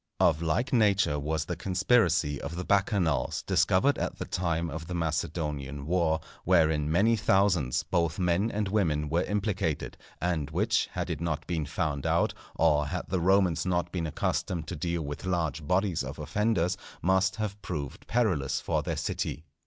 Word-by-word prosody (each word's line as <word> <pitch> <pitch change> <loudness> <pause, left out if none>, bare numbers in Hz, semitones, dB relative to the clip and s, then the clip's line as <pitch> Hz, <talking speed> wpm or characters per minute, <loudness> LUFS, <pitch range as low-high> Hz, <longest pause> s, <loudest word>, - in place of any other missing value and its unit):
Of 75 - +3
like 85 +12 0
nature 100 - +3
was 80 +1 -1
the - - -3
conspiracy 90 - +2
of 85 - -5
the 90 +1 -4
Bacchanals, 95 -8 +1
discovered - - +3
at - - -3
the - - -4
time 85 -2 -1
of 80 +2 -6
the 90 - -4
Macedonian 75 -3 -2
war, 80 -1 +1 0.2
wherein 80 -4 +3
many 105 +8 +4
thousands, 95 - +2
both 85 -1 0
men 90 +3 +1
and 105 -2 -1
women, 80 -7 0
were 85 +3 +2
implicated, 100 -6 -2 0.2
and 80 -5 -1
which, 105 +7 +1
had 90 0 -3
it 80 -1 -4
not 85 -3 -2
been 80 -4 -2
found 70 0 -2
out, - - +2 0.2
or 75 -3 +3
had 90 +2 -4
the 95 - 0
Romans 95 -1 +3
not 85 -2 -1
been 85 -3 -2
accustomed 80 +1 -2
to 90 - -4
deal 85 +1 -2
with 75 0 -6
large 85 -4 -1
bodies 90 -1 +1
of - - -6
offenders, 100 -4 0 0.3
must 95 +2 +2
have 105 -2 -4
proved 75 +4 -5
perilous 95 - +1
for - - -1
their - - -3
city. 75 - -3
85 Hz, 170 wpm, -28 LUFS, 80-95 Hz, 0.3 s, many